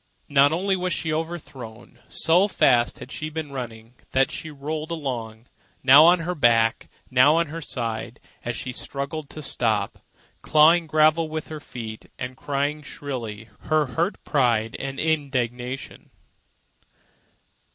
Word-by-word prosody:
Not 140 0 +5
only 190 +4 +1
was 180 -1 -1
she 155 0 -2
overthrown. 150 -8 -6
So 175 +5 +3
fast 120 -11 +3
had 130 - -10
she 155 - -4
been 155 -2 -5
running 115 -3 -7 0.2
that 135 0 +3
she 160 - -6
rolled 155 +2 -5
along, 120 -8 -4 0.4
now 140 +4 +9
on 175 0 +5
her 175 +2 -2
back, 115 -7 +2 0.2
now 130 +4 +6
on 165 -2 +1
her 165 +2 -6
side, 115 -6 -4 0.2
as - - -3
she 130 - -5
struggled 140 +3 -5
to 155 - -8
stop, 110 -6 0 0.4
clawing 160 +2 +5
gravel 155 +1 +3
with 155 0 -5
her 155 -1 -6
feet 110 -6 -8
and 125 0 -5
crying 145 +2 -2
shrilly 120 -7 -6 0.2
her 155 0 +2
hurt 170 +5 0
pride 115 -6 +1
and 135 0 -5
indignation. 135 -4 -2
140 Hz, 140 wpm, -24 LUFS, 125-155 Hz, 0.4 s, now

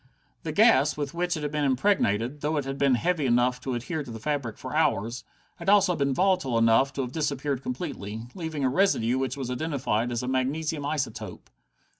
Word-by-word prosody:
The - - -4
gas 140 +4 +4
with 145 -1 -3
which 175 0 -1
it 150 - -5
had 145 - -2
been 150 -1 -1
impregnated, 135 - +1
though 150 +1 0
it 145 - -1
had 135 0 -5
been 135 -2 +4
heavy 165 +1 0
enough 125 +1 +2
to 130 -1 -3
adhere 155 +7 -3
to 145 - -9
the 115 - -6
fabric 130 -3 -2
for - - -6
hours, 115 +5 0 0.3
had - - -3
also 200 -3 +5
been 140 -2 0
volatile 180 -6 +1
enough 115 +4 +4
to 140 - -2
have 125 -2 -4
disappeared 140 -3 -2
completely, 125 - -5
leaving 160 -5 -4
a - - +3
residue 130 - +2
which 135 0 -2
was 130 -2 -4
identified 125 -5 -1
as 120 0 -2
a - - -3
magnesium 140 +4 -1
isotope. 140 -6 -4
135 Hz, 200 wpm, -26 LUFS, 125-155 Hz, 0.3 s, also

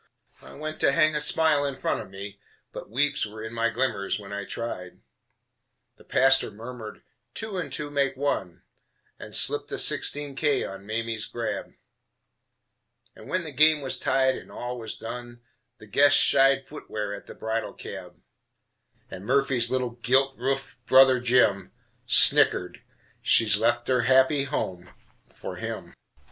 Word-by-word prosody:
I - - -14
went 155 +1 -6
to - - +3
hang 155 -2 +3
a 150 - 0
smile 150 -1 +2
in 140 -2 -3
front - - -2
of - - -11
me, 100 +1 -9 0.3
But - - -9
weeps 145 +5 0
were 110 0 -7
in 110 +1 -7
my 115 0 0
glimmers 115 -5 -1
when 100 0 -10
I 100 0 -5
tried. 90 -7 -7 1.0
The - - -18
pastor 135 0 +3
murmured, 110 +1 -10 0.3
"Two 215 -4 -4
and 180 - -5
two 150 -2 -3
make 140 -2 0
one," 95 -11 -3 0.6
And - - -7
slipped - - +3
a - - -3
sixteen 145 -1 +1
K 145 -2 +1
on 95 +1 -8
Mamie's 115 0 -3
grab; 120 -1 -5 1.4
And - - -14
when 185 -1 -1
the 155 - -7
game 150 +2 +4
was 135 - -1
tied 130 -1 +2
and - - -11
all 125 0 -6
was 110 -1 -3
done 120 +1 -8 0.4
The - - -14
guests 140 +7 +4
shied 135 0 +3
footwear 105 -8 -6
at 100 - -10
the - - -11
bridal 110 0 -3
cab, - - -10 0.9
And 95 - -8
Murphy's 130 -1 +1
little 130 -2 -1
gilt 130 +3 +1
roofed 135 +2 -4
brother 130 -1 +6
Jim 120 -6 +2 0.3
Snickered, - - +4 0.4
"She's 105 -3 +4
left 120 +1 +1
her 125 -1 +2
happy 130 +3 +3
home 90 -10 -4 0.4
for - - -8
him." - - -6
125 Hz, 155 wpm, -25 LUFS, 110-140 Hz, 1.4 s, brother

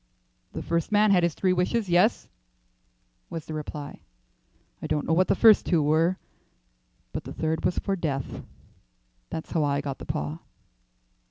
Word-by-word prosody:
"The - - -5
first 170 +3 -1
man 210 0 +4
had 185 -2 +5
his 170 -3 0
three 185 -1 +2
wishes. 195 +5 0
Yes," 180 +6 +3 1.0
was 165 -3 -6
the 155 - -7
reply; 150 -1 -6 0.8
"I - - -4
don't 150 -1 -1
know 160 - +1
what 185 +3 +3
the - - +3
first 220 -2 +6
two 165 -4 +3
were, 160 +5 +2 1.0
but - - -4
the - - -8
third 160 0 -1
was 180 - 0
for 195 - -1
death. 140 -7 -3 0.9
That's 160 -1 -6
how 160 -3 +1
I 140 -1 +1
got 140 -2 -5
the - - -8
paw." 75 +2 -3
165 Hz, 165 wpm, -26 LUFS, 150-185 Hz, 1.0 s, first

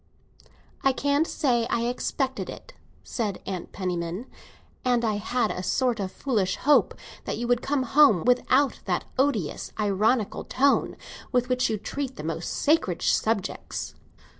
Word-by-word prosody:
"I 270 - +4
can't 285 +4 +1
say 240 -6 +1
I 235 - +1
expected 260 +2 -2
it," - - -10 0.3
said 210 -6 -3
Mrs. 185 -3 -5
Penniman. 180 +2 -3 0.6
"And 245 -2 +2
I 215 -2 +1
had 220 +2 0
a 180 - -4
sort 245 +4 0
of 190 -2 -3
foolish 210 -8 0
hope 295 +1 +3 0.3
that - - -3
you 240 - -3
would 245 0 +2
come 275 -1 0
home 265 - +5
without 255 +2 +3
that - - -1
odious 255 - 0
ironical 210 +2 +1
tone 275 +2 +2 0.3
with 250 -1 +1
which 255 0 +2
you 220 - 0
treat 265 +5 -4
the - - -7
most 165 +1 -3
sacred 290 - +1
subjects." 220 -4 -1
240 Hz, 145 wpm, -26 LUFS, 200-265 Hz, 0.6 s, home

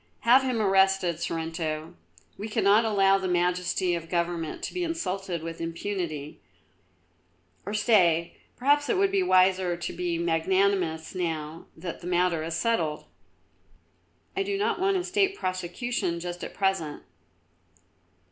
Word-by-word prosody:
"Have 245 +3 +6
him 255 -3 -1
arrested, 190 -4 +3
Sorrento. 165 -1 -3 0.4
We 210 +2 -6
cannot 210 +2 +4
allow 195 -2 +4
the 190 - -2
majesty 180 0 +1
of 165 -1 -4
Government 170 -2 -2
to - - -4
be 360 - -2
insulted 195 - -3
with 165 0 -6
impunity, 165 -3 -4 1.3
or 205 - -2
stay, 175 -7 +3 0.2
perhaps 290 +3 +2
it 405 - +2
would 390 0 +3
be 395 -1 +2
wiser 185 - +3
to 175 - -5
be 175 -1 -2
magnanimous 170 0 +1
now 165 -3 -4
that 175 -3 -6
the 175 - -7
matter 180 -2 +1
is 165 0 -3
settled. 170 -6 0 1.3
I 385 - 0
do 395 0 -1
not 410 -2 0
want 385 +1 +2
a 360 - -1
State 390 +1 +1
prosecution 185 +1 -2
just 175 +1 -6
at - - -7
present." 190 -7 -1
180 Hz, 140 wpm, -27 LUFS, 170-210 Hz, 1.3 s, Have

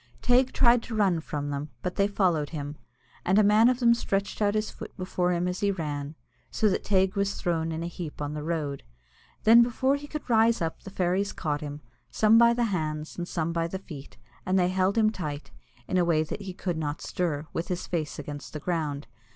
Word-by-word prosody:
Teig 250 +1 +4
tried 240 0 +5
to 230 - -6
run 195 -6 +2
from 145 -2 -4
them, 145 +2 -4
but 180 - -2
they 200 - +3
followed 175 -8 +1
him, 145 -2 -5 0.5
and 190 +3 +2
a 215 - +6
man 215 +3 +6
of 255 -1 0
them 235 -2 +5
stretched 200 -3 -2
out 205 0 +2
his 215 0 -1
foot - - -10
before 180 -1 -1
him 175 0 0
as 180 +1 -2
he 205 - +1
ran, 150 -5 -3 0.3
so 220 - +1
that 190 - -1
Teig 190 -1 +2
was 200 0 0
thrown 165 -3 -1
in 160 +1 -3
a - - -2
heap 170 -3 -7
on 145 0 -3
the 150 - -4
road. 150 -3 -2 0.6
Then 230 +2 +8
before 260 +3 +2
he 290 +1 -9
could 305 0 -6
rise 230 -1 +4
up 165 -1 -3
the - - -9
fairies 190 +1 0
caught 150 -2 -2
him, 145 0 -6 0.3
some 220 +1 +5
by 235 0 +7
the 240 - +1
hands 155 -2 -3
and 175 0 -4
some 165 -2 -2
by 165 0 0
the 190 - -4
feet, 150 -7 -11 0.3
and 185 +1 +1
they 180 -1 +3
held 190 +3 +1
him 215 -1 +4
tight, 150 -8 -6 0.4
in 185 - +1
a - - +4
way 160 -2 +2
that 160 - -6
he 190 -2 -6
could 180 -4 -3
not 150 -1 -3
stir, 160 -4 -2
with 165 - -2
his 180 -1 -3
face 155 -4 -3
against 145 0 -7
the 155 - -4
ground. 150 -3 -2
180 Hz, 225 wpm, -27 LUFS, 155-205 Hz, 0.6 s, Then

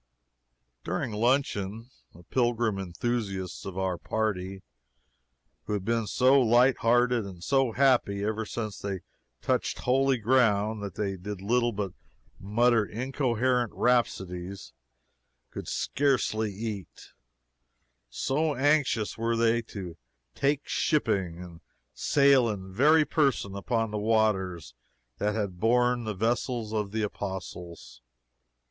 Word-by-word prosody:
During - - -2
luncheon, 115 -1 0 0.2
the 85 - -15
pilgrim 120 -3 0
enthusiasts 95 0 -3
of 95 -1 -7
our 95 -2 -1
party, 95 -3 -2 1.0
who - - -3
had 100 -2 -2
been 115 -1 0
so 130 +4 +4
light 125 +2 +4
hearted 120 0 +3
and 90 -3 -9
so 135 0 +2
happy 120 -7 +2
ever 110 +1 -1
since 110 -1 -5
they 100 -3 -4 0.4
touched - - 0
holy 135 +1 +2
ground 110 -3 +2
that 100 -4 -6
they 100 -2 -2
did 100 +2 -6
little 120 +4 +1
but 100 -3 -3 0.5
mutter 115 +3 +3
incoherent 125 0 0
rhapsodies, 95 -6 -1 0.8
could - - -7
scarcely 125 -6 0
eat, 100 -2 -7 1.0
so 145 - 0
anxious 135 -6 +1
were 115 0 0
they 115 0 +3
to 95 -7 -8 0.4
"take 145 +1 0
shipping" 95 - 0
and 85 -2 -12 0.3
sail 140 -4 +4
in 95 -3 -6
very 150 +8 +5
person 135 -12 0
upon 115 +2 -1
the 105 - -2
waters 100 - 0 0.5
that 105 +1 0
had 100 -5 -3
borne 120 +2 +2
the 110 -2 -3
vessels 115 +1 -1
of 105 -2 -1
the 110 0 -1
Apostles. 90 -9 -6
110 Hz, 120 wpm, -28 LUFS, 100-125 Hz, 1.0 s, very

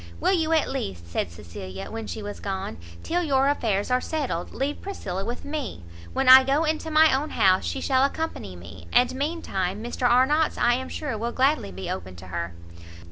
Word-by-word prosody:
"Will - - +2
you 325 -3 +1
at 320 -2 +3
least," 95 - -4
said 85 - -1
Cecilia, 95 +3 -8
when 225 0 -5
she 220 - -5
was 205 0 -6
gone, 190 - -4 0.3
"till 350 +1 0
your 275 -5 +2
affairs 220 -6 0
are 250 0 +3
settled, 275 - -3
leave 280 +2 -3
Priscilla 195 - -4
with 240 +4 -5
me? 285 - -4 0.3
When 270 - -1
I 260 +1 +11
go 275 +4 +2
into 315 0 -1
my 310 -2 +5
own 295 +3 -1
house, 185 -1 +3
she 270 - -3
shall 260 -1 +3
accompany 280 - -2
me, 85 0 -12
and 245 +1 +4
mean 305 +6 -2
time 190 +2 -2
Mr 240 +1 0
Arnott's 280 +6 +3
I 240 - +4
am 260 +1 -3
sure 295 -7 -3
will 235 +2 -2
gladly 265 - +1
be 95 +1 -6
open 95 0 -5
to 90 +2 -11
her." 85 -1 -4
250 Hz, 200 wpm, -25 LUFS, 180-290 Hz, 0.3 s, I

